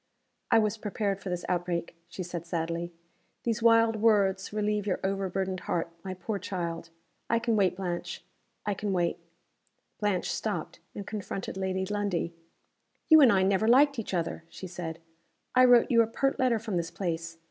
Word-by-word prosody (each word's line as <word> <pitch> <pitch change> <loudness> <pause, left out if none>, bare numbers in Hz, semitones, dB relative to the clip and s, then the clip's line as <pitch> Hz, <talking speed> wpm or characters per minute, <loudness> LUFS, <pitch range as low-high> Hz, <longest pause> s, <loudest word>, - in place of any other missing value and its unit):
"I - - +5
was 215 0 +1
prepared 205 -2 -2
for 195 - -5
this 180 -1 -3
outbreak," 175 -1 -2
she 185 +1 -6
said, 175 -1 -5
sadly. 170 0 -2 0.5
"These 230 -1 -1
wild 230 -1 +5
words 200 -3 +2
relieve 210 -1 -1
your 185 - 0
over 195 0 -1
burdened 190 0 -2
heart, 170 -1 -2
my 190 -1 -5
poor 200 +2 -4
child. 170 -3 -4 0.4
I 230 - +3
can 230 -1 +1
wait, 195 -3 +2
Blanche 180 -2 -4 0.4
I 205 - +1
can 200 0 -2
wait!" 175 -2 0 0.8
Blanche 205 -4 0
stopped, - - -3 0.2
and 200 - -6
confronted 205 -3 -5
Lady 190 0 -1
Lundie. 200 -4 -1 0.8
"You 315 -1 +9
and 260 -5 +8
I 190 -2 +3
never 195 +3 +2
liked 275 +2 +5
each 205 -4 -3
other," 165 -1 -2
she 190 - -9
said. 170 -2 -6 0.6
"I 255 0 +7
wrote 245 -2 +6
you 230 -1 +6
a 225 - +2
pert 270 +4 0
letter 255 -3 +3
from 215 -4 -3
this 170 0 -2
place. 165 -3 -4
195 Hz, 175 wpm, -29 LUFS, 180-220 Hz, 0.8 s, You